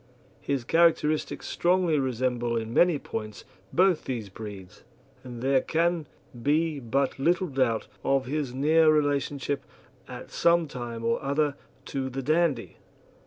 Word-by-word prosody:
His 140 Hz, -3 st, -2 dB
characteristics 155 Hz, 0 st, +2 dB
strongly 175 Hz, -3 st, +2 dB
resemble 125 Hz, -2 st, -1 dB
in 115 Hz, 0 st, -4 dB
many 175 Hz, +1 st, +4 dB
points 110 Hz, -6 st, -6 dB, 0.3 s
both 185 Hz, -2 st, +3 dB
these 115 Hz, -6 st, -4 dB
breeds, 95 Hz, -3 st, -10 dB, 0.4 s
and 120 Hz, -2 st, -8 dB
there 135 Hz, 0 st, +3 dB
can 165 Hz, -1 st, 0 dB, 0.3 s
be 150 Hz, +2 st, +1 dB
but 135 Hz, +3 st, -1 dB
little 175 Hz, +6 st, +2 dB
doubt 130 Hz, -5 st, 0 dB, 0.2 s
of 135 Hz, -1 st, +1 dB
his 145 Hz, 0 st, -2 dB
near 155 Hz, +4 st, +4 dB
relationship 145 Hz, -2 st, 0 dB, 0.4 s
at 125 Hz, -1 st, -9 dB
some 170 Hz, -1 st, +3 dB
time 120 Hz, -4 st, -6 dB
or 115 Hz, -, +1 dB
other 140 Hz, +1 st, 0 dB, 0.3 s
to 135 Hz, -1 st, -3 dB
the 135 Hz, +1 st, -5 dB
Dandie. 155 Hz, -4 st, 0 dB
135 Hz, 130 wpm, -27 LUFS, 120-155 Hz, 0.4 s, many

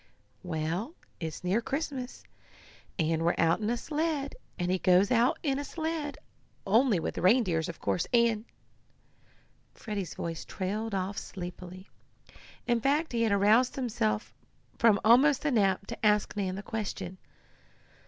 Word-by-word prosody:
"Well, 175 Hz, -, -3 dB, 0.2 s
it's 160 Hz, 0 st, -5 dB
near 190 Hz, +6 st, +1 dB
Christmas, 270 Hz, -1 st, -4 dB, 0.7 s
and 160 Hz, -2 st, +1 dB
we're 170 Hz, +1 st, +2 dB
out 165 Hz, 0 st, +3 dB
in 215 Hz, 0 st, -1 dB
a 240 Hz, -, 0 dB
sled, 300 Hz, 0 st, -2 dB, 0.2 s
and 180 Hz, -1 st, -1 dB
he 185 Hz, -, +1 dB
goes 185 Hz, +4 st, +4 dB
out 245 Hz, +1 st, +3 dB
in 275 Hz, -3 st, 0 dB
a -, -, -3 dB
sled, 315 Hz, -2 st, -4 dB, 0.5 s
only 220 Hz, 0 st, +3 dB
with 160 Hz, -, -3 dB
reindeers 185 Hz, -5 st, +3 dB
of 170 Hz, -, -7 dB
course, 180 Hz, -, -1 dB
and 235 Hz, -2 st, +3 dB, 0.7 s
" -, -, -35 dB
Freddie's 200 Hz, -6 st, -5 dB
voice 165 Hz, -1 st, -4 dB
trailed 205 Hz, +3 st, -3 dB
off 195 Hz, +2 st, -2 dB
sleepily. 180 Hz, 0 st, -8 dB, 0.8 s
In 240 Hz, -1 st, +1 dB
fact 295 Hz, +5 st, +1 dB
he 235 Hz, -, +1 dB
had 225 Hz, -2 st, +2 dB
aroused 210 Hz, +5 st, +4 dB
himself 110 Hz, -, -1 dB, 0.5 s
from 220 Hz, -4 st, +5 dB
almost 265 Hz, +6 st, +5 dB
a 295 Hz, -, +2 dB
nap 200 Hz, -5 st, +2 dB
to -, -, -8 dB
ask 210 Hz, -1 st, +2 dB
Nan 190 Hz, -2 st, -2 dB
the 200 Hz, -, -6 dB
question. 195 Hz, -4 st, -5 dB
210 Hz, 145 wpm, -29 LUFS, 180-250 Hz, 0.8 s, from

